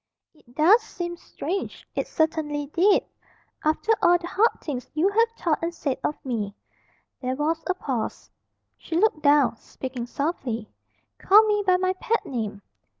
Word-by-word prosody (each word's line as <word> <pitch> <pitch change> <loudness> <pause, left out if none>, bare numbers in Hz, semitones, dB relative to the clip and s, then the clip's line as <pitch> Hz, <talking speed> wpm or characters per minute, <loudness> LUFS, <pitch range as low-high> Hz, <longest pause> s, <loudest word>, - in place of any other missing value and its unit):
"It 245 -6 -24
does 370 +10 +6
seem 350 -5 -5
strange." 365 +2 -5
It - - -2
certainly 310 -2 0
did. 395 +4 +4 0.6
"After 315 +8 +1
all 350 0 +6
the 345 - -9
hard 420 +6 +2
things 260 -5 -5
you 335 +6 +3
have 455 +3 +3
thought 325 -3 0
and 335 +1 -1
said 275 -6 -2
of 300 - 0
me." 210 -5 -3 0.7
There 255 0 -1
was 315 +3 -1
a 370 - +1
pause. 260 -10 -4 0.5
She 330 - -3
looked 380 -5 +2
down, 285 -5 +4
speaking 255 -1 -6
softly. 245 -6 -3 0.5
"Call 420 +3 +7
me 415 -1 +1
by 365 -1 +5
my 370 0 +1
pet 455 +2 -1
name." 215 -6 -4
315 Hz, 155 wpm, -25 LUFS, 265-370 Hz, 0.7 s, Call